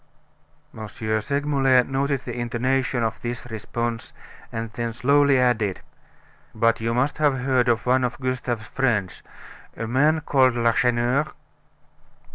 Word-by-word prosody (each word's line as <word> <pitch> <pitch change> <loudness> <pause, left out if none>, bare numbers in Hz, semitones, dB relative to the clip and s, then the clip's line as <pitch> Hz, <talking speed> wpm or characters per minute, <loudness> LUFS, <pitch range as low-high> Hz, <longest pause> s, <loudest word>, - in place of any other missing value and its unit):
M. 110 -1 -7
Segmuller 130 +5 +1
noted 135 +1 -1
the 120 - -6
intonation 125 +1 -1
of 110 0 -2
this 120 0 -5
response, 115 +1 -4 0.4
and 115 0 -5
then 115 -1 -3
slowly 140 +3 +3
added: 115 -6 +1 0.7
"But 115 +1 +2
you 115 +1 -1
must 135 +5 0
have 145 -4 +2
heard 130 -1 +2
of 115 -1 +1
one 130 +1 +3
of 125 -1 -2
Gustave's 125 -3 -3
friends, 105 -11 -1 0.6
a 115 - -3
man 150 +7 +2
called 130 -5 +3
Lacheneur?" 120 +4 +2
125 Hz, 125 wpm, -23 LUFS, 115-135 Hz, 0.7 s, slowly